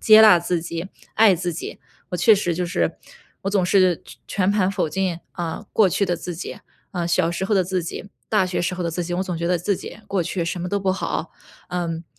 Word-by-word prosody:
接 215 0 +8
纳 210 -5 +8
自 170 0 -1
己， 170 +1 -4 0.3
爱 215 -4 +6
自 175 0 -2
己。 165 - -6 0.3
我 180 - -1
确 220 +5 +6
实 175 -4 0
就 180 +1 -1
是， 170 -2 0 0.5
我 195 - -1
总 195 -3 +2
是 185 -2 +3 0.2
全 195 -1 +1
盘 200 -2 +2
否定， 185 -1 -1
啊， 170 -3 -4
过 210 -4 +5
去 200 +4 +1
的 175 -2 0
自 175 +1 -5
己， 170 - -6 0.3
啊， 175 -2 -2
小 170 0 +2
时 180 +2 -2
候 205 +2 +1
的 185 -2 +3
自 185 -1 -1
己， 175 +4 -6 0.2
大 210 -3 +3
学 185 0 -1
时 180 +1 -1
候 180 - -3
的 170 - -1
自 175 +2 -2
己。 175 +1 -3
我 185 - 0
总 180 -3 -3
觉 170 - -1
得 180 0 +3
自 180 +3 0
己 - - -9
过 195 -3 0
去 170 +1 -2
什 170 +1 -3
么 180 - -3
都 200 - 0
不 190 -1 +1
好。 195 - -3 0.4
嗯， 170 -2 -3
180 Hz, 260 characters per minute, -23 LUFS, 170-195 Hz, 0.5 s, 接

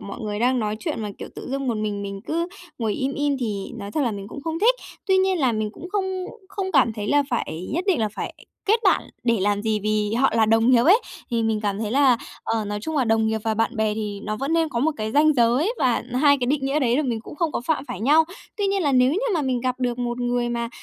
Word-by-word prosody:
mọi 200 - -7
người 210 -1 -3
đang 250 +2 +2
nói 215 -1 -1
chuyện 220 - -3
mà, 210 - -3
kiểu, - - -7
tự - - -8
dưng 275 -1 -2
một 230 - 0
mình 210 -1 -2
mình 200 -1 -5
cứ 335 +2 -1 0.3
ngồi 220 -3 0
im 270 +4 -2
im 290 -1 0
thì 205 -4 -3
nói 200 -1 -6
thật 305 - -1
là 240 - +1
mình 200 -1 -6
cũng 280 - -8
không 325 0 -3
thích. 475 +5 +5 0.3
Tuy 380 -1 +4
nhiên 375 -1 +2
là 260 -5 +2
mình 215 -1 -1
cũng 355 - -9
không 380 -2 -1 0.2
không 380 -2 -4
cảm 255 -6 +4
thấy 210 -1 -5
là 290 0 +4
phải 185 -7 -2
nhất 350 +5 -1
định 355 -10 +2
là 215 - +1
phải - - -5 0.3
kết 440 +3 +3
bạn 380 - +4 0.2
để 230 -4 +2
làm 205 +1 +1
gì, 215 -2 0
vì 215 0 0
họ 270 +3 +3
là 220 -1 +4
đồng 225 +2 +4
nghiệp 240 -2 +5
ấy, 395 +9 +6 0.3
thì 230 -1 +1
mình 220 -1 0
cảm 205 -1 -1
thấy 215 -1 -2
là, 265 -2 +4 0.3
ờ, 225 -2 -1
nói 205 0 -3
chung 315 +5 -4
là 260 - +3
đồng 225 -1 +2
nghiệp 220 0 0
và 220 -1 +1
bạn 225 +2 0
bè 215 -1 +1
thì 210 -2 -4
nó 215 0 -3
vẫn 275 +6 -2
nên 330 -1 +2
có 235 - -3
một 315 +4 +3
cái 215 0 -3
ranh 305 +1 +5
giới 255 - +2
và 250 -2 +2
2 285 +2 +5
cái 245 - 0
định 275 0 0
nghĩa 280 +3 +1
đấy 245 -3 +2
là 305 - +2
mình 235 -5 -2
cũng 230 - -10
không 330 -3 0
có - - -1
phạm 315 -3 0
phải - - -5
nhau. 300 +7 +5 0.3
Tuy 405 -2 0
nhiên 390 -1 +1
là 285 -2 +2
nếu 255 +2 +4
như 375 - +1 0.2
mà 310 - +1
mình 255 -2 0
gặp 255 0 -2
được 245 -1 -1
một 240 0 -2
người 245 0 0
mà, 235 -1 -2
245 Hz, 285 wpm, -23 LUFS, 220-295 Hz, 0.3 s, ấy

